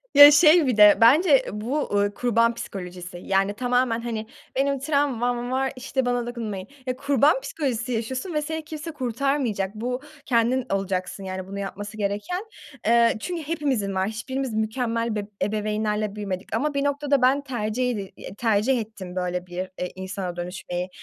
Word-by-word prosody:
Ya, 285 +1 +12
şey 310 0 +6
bir 245 - +1
de 210 -1 +8
bence 280 +5 +6
bu, 230 +8 -2
uuu, 205 -5 0
kurban 230 0 +2
psikolojisi, 180 -5 -7
yani, 195 +1 +2
tamamen, 245 0 +1
hani, 225 -2 -4 0.3
benim 275 0 +1
travmam 245 -4 0
var, 265 +1 0
işte, 260 0 -2
bana 245 -1 0
dokunmayın. 215 -5 -5 0.2
Ya, 255 0 -1
kurban 280 - +3
psikolojisi 250 - -2
yaşıyorsun 255 - -3
ve 300 - +1
seni 320 +1 -4
kimse 310 +1 -6
kurtarmayacak. 250 -6 -1
Bu 250 +4 -3 0.2
kendin 240 +1 +2
olacaksın, 195 0 -2
yani, 185 0 -5
bunu 200 +1 -6
yapması 205 +2 -6
gereken. 210 - -2 0.4
Eee, 235 0 +5
çünkü 345 +1 -4
hepimizin 270 -11 -1
var. 190 +1 +1
Hiçbirimiz 260 +3 -3
mükemmel, 230 +1 -1
be 210 - -1 0.2
ebeveynlerle 210 0 -1
büyümedik 200 0 -4
ama 290 +5 0
bir 280 0 0
noktada 285 -1 +1
ben 265 +3 +4
tercih 250 -2 -2
edi 200 -4 -5 0.3
tercih 230 +3 +2
ettim 195 -4 -9
böyle 180 0 -2
bir, 175 0 -9 0.2
eee, 180 - -3
insana 190 -1 -5
dönüşmeyi. 180 0 -4
230 Hz, 155 wpm, -24 LUFS, 205-270 Hz, 0.4 s, Ya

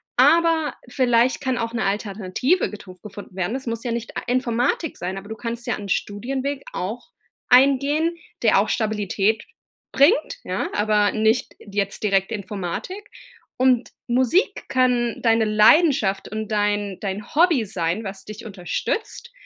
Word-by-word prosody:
Aber 330 -2 +4
vielleicht 245 -1 +2
kann 260 -2 -1
auch 230 0 -3
'ne 235 - -1
Alternative 205 - 0
getu 190 -3 -11
gefunden 205 -2 -10
werden. 190 +6 -2
Es 265 - -5
muss 230 -1 -3
ja 240 - -2
nicht 230 -1 -5
a - - -2
Informatik 250 +5 0
sein, 185 +2 -4
aber 195 +1 -8
du 220 - -6
kannst 235 0 -5
ja - - 0
'n 205 -1 -8
Studienweg 265 +9 -2
auch 215 +7 -5 0.4
eingehen, 280 +6 +4 0.3
der 215 -3 +5
auch 210 - 0
Stabilität 215 -1 0 0.5
bringt. 360 - +3
Ja, - - -3
aber 210 -1 +2
nicht 220 +2 +1
jetzt 200 -1 -3
direkt 195 0 +1
Informatik 205 - -5 0.5
und 255 -1 +3 0.2
Musik 255 - +1
kann 250 -2 +1
deine 225 -1 +3
Leidenschaft 215 - +4
und 215 0 -4
dein 205 -2 0
dein 200 +1 -5
Hobby 320 -8 +4
sein, 180 0 -2
was 195 -1 -6
dich 215 +2 -9
unterstützt. 220 - -4
225 Hz, 145 wpm, -22 LUFS, 205-255 Hz, 0.5 s, der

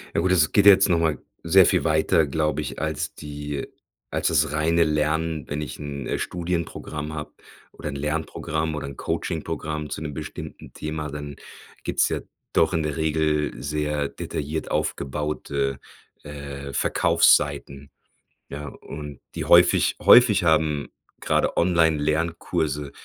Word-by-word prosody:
Ja - - +3
gut, 90 +2 +1
das 80 -4 +3
geht 100 - +4
ja 100 - +11
jetzt 95 +1 +3
noch 85 -2 +3
mal 80 -2 +1 0.3
sehr 90 +3 +6
viel 90 -3 +2
weiter, 80 0 +3
glaube 75 +1 0
ich, 70 - -6
als 80 -2 -3
die 75 -1 -5 0.5
als - - 0
das - - +2
reine 80 +2 +2
Lernen, 75 -1 0
wenn 75 +1 -3
ich 75 - -6
'n, 70 -3 -5
äh, - - -2
Studienprogramm 85 -3 -4
habe 75 -1 -6 0.4
oder - - -8
'n 75 - -4
Lernprogramm 80 +1 -2
oder 75 - -4
'n 70 - -9
Coaching-Programm 75 -2 -3
zu - - -5
'nem 75 -2 -5
bestimmten 75 +2 -8
Thema. 75 0 -4
Dann 75 0 -7 0.5
gibt's - - +2
ja - - -1 0.3
doch - - +3
in 80 - +1
der 75 0 -3
Regel 75 -1 +1
sehr 75 0 -1
detailliert 75 +2 -4
aufgebaute, 70 -2 -2 0.4
äh, 70 -1 -7
Verkaufsseiten, 70 +2 +2 0.6
ja, 75 +1 -6
und 75 -1 -9
die - - -4
häufig - - +5
häufig 110 -6 +7
haben 80 -3 +2 0.3
grade - - 0
Online-Lernkurse 80 -3 +1
75 Hz, 145 wpm, -24 LUFS, 75-80 Hz, 0.6 s, ja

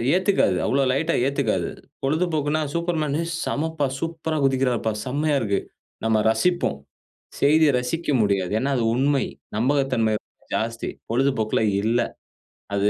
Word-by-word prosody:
ஏத்துக்காது 185 - +2
அவ்ளோ 135 +1 +2
லைட்டா 160 +5 +1
ஏத்துக்காது. 115 -11 0 0.3
பொழுதுபோக்குன்னா 155 0 +1
Superman 165 -4 0
"ஏ - - -2 0.2
செமப்பா! 160 -1 -1
சூப்பரா 160 -1 -3
குதிக்கிறார்ப்பா, 130 -4 +1
செம்மையா 145 +3 0
இருக்கு!" 100 -3 +1 0.5
நம்ம 110 -1 +3
ரசிப்போம். 175 - +1 0.6
செய்திய 155 +1 +5
ரசிக்க 160 +7 -3
முடியாது. 100 -3 +1
ஏன்னா 140 +2 0
அது 115 - +1
உண்மை! 140 +1 +2 0.3
நம்பகத்தன்மை 130 -3 +2
ரொம்ப - - -35
ஜாஸ்தி. 115 +1 -2 0.2
பொழுதுபோக்குல 115 -4 +1 0.2
இல்ல. 115 +2 +2 0.8
அது 100 +1 +2
140 Hz, 120 wpm, -23 LUFS, 115-155 Hz, 0.8 s, செய்திய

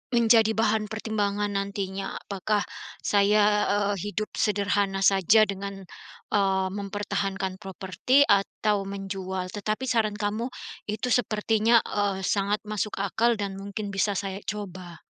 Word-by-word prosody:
menjadi 225 -1 +5
bahan 220 -1 +2
pertimbangan 205 -2 -1
nantinya, 195 -1 -3 0.2
apakah 205 +1 -1 0.5
saya, 205 +1 +4 0.3
eee, 205 0 +1
hidup 210 +1 -3 0.2
sederhana 200 -1 0
saja 195 +3 +5
dengan, 200 0 -5 0.6
eee, 190 -2 +2
mempertahankan 200 -1 -2
properti 195 +8 +2 0.2
atau 210 +1 -1
menjual. 190 -1 -4
Tetapi 215 +5 -2
saran 215 -3 +1
kamu, 215 +4 -1 0.4
itu 215 +4 -3
sepertinya, 220 0 +2
eee, 200 -2 0 0.2
sangat 200 +1 0
masuk 210 0 -2
akal 235 +5 +2
dan 200 -1 -2
mungkin 200 +1 -5
bisa 200 +1 +2
saya 195 0 -3
coba. 185 -5 -6
205 Hz, 120 wpm, -26 LUFS, 195-215 Hz, 0.6 s, menjadi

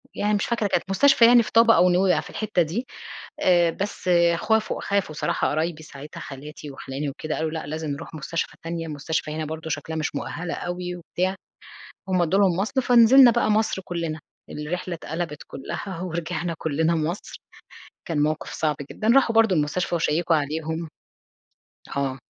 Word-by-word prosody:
يعني 210 +1 0
مش 205 - 0
فاكرة 230 -3 0
كانت - - 0
مستشفى 265 +4 +5
يعني 240 0 +7
في - - -8
طابا 230 0 +6
أو 180 +2 +5
نويبع 180 -2 +3
في - - -12
الحتة 215 -4 0
دي. 180 +11 -2 0.5
آآ 175 -2 +4
بس 195 -1 -4 0.3
خافوا 220 +3 0
خافوا 200 -6 -1
صراحة - - 0
قرايبي 160 +1 -2
ساعتها 145 0 -10
خالاتي 145 +1 -9
وخِلاني 135 +2 -5
وكده 155 +3 -4
قالوا: 160 0 -2
"لأ 160 -2 -4
لازم 155 0 -4
نروح 140 - -7
مستشفى 160 +3 -4
تانية، 165 0 -4
المستشفى 155 +2 -3
هنا 155 0 -3
برضه 160 +1 -6
شكلها 160 +1 -3
مش 155 -2 -2
مؤهلة 165 +4 -4
أوي 180 0 -4
وبتاع." 180 +2 -2 0.7
هُم 185 -2 +2
ادوا 175 +3 +2
لهم 190 -4 +3
مَصل، 225 +7 0
فنزلنا 245 +1 +7
بقى 215 - +1
مصر 215 -3 +1
كلّنا، 165 -3 -4 0.3
الرحلة 170 +4 -4
اتقلبت 160 -1 -5
كلّها 170 +6 -6
ورجعنا 170 -1 -3
كلّنا 160 +2 +1
مصر، 165 +4 -3 0.6
كان 155 -4 0
موقِف 155 +1 -1
صعب 150 -2 0
جدًا. 215 - -3
راحوا 250 -4 +4
برضه 225 -5 +4
المستشفى 155 +4 0
وشيّكوا 165 0 +2
عليهم 160 +2 -3 1.1
آه، 135 -1 -1
170 Hz, 165 wpm, -24 LUFS, 155-195 Hz, 1.1 s, يعني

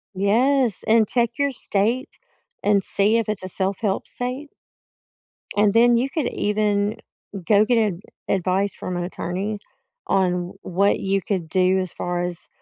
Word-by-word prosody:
Yes, 235 +4 +2
and 220 -1 +4
check 235 +1 0
your 280 0 +1
state 235 +3 -1 0.4
and 200 -1 +3
see 210 +3 +2
if 225 -2 -1
it's 210 -3 -3
a - - -4
self-help 195 +2 -1
state 255 +4 -4 1.1
and 205 0 +3
then 235 +1 +5
you 260 +3 0
could 305 -2 -1
even 210 0 0 0.5
go 210 0 +4
get 240 +2 +2 0.2
a 170 - -11 0.3
advice 190 +1 0
from 180 -1 -5
an 175 - -2
attorney 190 +4 -4 0.5
on 190 -2 +2
w 180 0 -4
what 195 +3 +1
you 195 0 0
could 185 -6 -1
do 185 +1 +3
as 185 -2 -3
far 175 0 -3
as 175 -1 -5
205 Hz, 155 wpm, -22 LUFS, 185-230 Hz, 1.1 s, then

